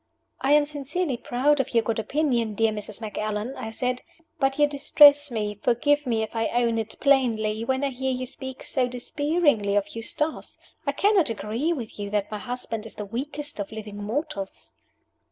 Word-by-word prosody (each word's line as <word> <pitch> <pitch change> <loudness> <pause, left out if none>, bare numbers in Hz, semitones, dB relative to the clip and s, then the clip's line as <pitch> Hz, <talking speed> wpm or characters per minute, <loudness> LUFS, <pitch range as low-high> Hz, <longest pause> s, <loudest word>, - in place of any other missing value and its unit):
"I 275 +2 +3
am 295 0 +6
sincerely 290 +1 -2
proud 270 +5 +1
of 265 - -1
your 230 - +5
good 225 0 -1
opinion, 235 -3 0
dear 225 +1 +3
Mrs. 210 0 -6
Macallan," 215 +2 -3
I 220 - -5
said. 250 +2 -2 0.4
"But 270 0 +1
you 295 - +6
distress 290 0 +6
me 210 -3 -3
forgive 290 +4 +2
me 225 -2 +1
if 220 - -7
I 225 -1 +1
own 235 -1 +1
it 220 0 -6
plainly 230 -6 +2
when 260 +3 0
I 280 - +2
hear 265 +1 -2
you 255 0 -2
speak 265 +1 -7
so 255 -2 0
disparagingly 255 -3 +1
of 205 +1 0
Eustace. 300 +7 -3 0.3
I - - +3
cannot 400 - +3
agree 225 +8 -1
with 240 -10 -5
you 205 0 -3
that 205 0 -1
my 210 - -3
husband 230 -2 -5
is - - -12
the 210 - -5
weakest 285 +5 -5
of 200 - -4
living 215 -2 -7
mortals." 210 -3 -4
245 Hz, 185 wpm, -25 LUFS, 220-285 Hz, 0.4 s, am